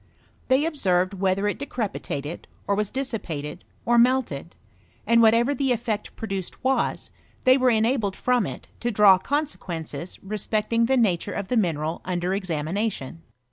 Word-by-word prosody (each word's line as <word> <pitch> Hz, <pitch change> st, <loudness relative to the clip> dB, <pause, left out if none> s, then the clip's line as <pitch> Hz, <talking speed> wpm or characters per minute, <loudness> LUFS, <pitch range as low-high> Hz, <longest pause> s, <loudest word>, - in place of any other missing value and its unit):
They 265 Hz, +4 st, +3 dB
observed 185 Hz, -, +1 dB
whether 195 Hz, +1 st, 0 dB
it 205 Hz, -, -2 dB
decrepitated, 195 Hz, -, -4 dB, 0.2 s
or 200 Hz, -, +1 dB
was 210 Hz, 0 st, 0 dB
dissipated, 185 Hz, -, -4 dB, 0.2 s
or 240 Hz, 0 st, +4 dB
melted; 235 Hz, -, +1 dB, 0.5 s
and 230 Hz, +1 st, +5 dB
whatever 230 Hz, +4 st, +4 dB
the 270 Hz, -1 st, 0 dB
effect 225 Hz, -3 st, -2 dB
produced 195 Hz, -5 st, -5 dB
was, 265 Hz, +1 st, 0 dB, 0.3 s
they 255 Hz, 0 st, +7 dB
were 255 Hz, -1 st, +3 dB
enabled 220 Hz, -3 st, +1 dB
from 250 Hz, -4 st, +1 dB
it -, -, -8 dB
to 240 Hz, -, -1 dB
draw 200 Hz, -4 st, +6 dB
consequences 185 Hz, -, -3 dB
respecting 215 Hz, +3 st, 0 dB
the 265 Hz, +1 st, +3 dB
nature 205 Hz, -4 st, +1 dB
of 200 Hz, -2 st, -4 dB
the 250 Hz, -, +1 dB
mineral 165 Hz, -6 st, 0 dB
under 180 Hz, 0 st, -2 dB
exa 175 Hz, -6 st, -2 dB
mination. 195 Hz, -6 st, -2 dB
210 Hz, 145 wpm, -25 LUFS, 185-245 Hz, 0.5 s, they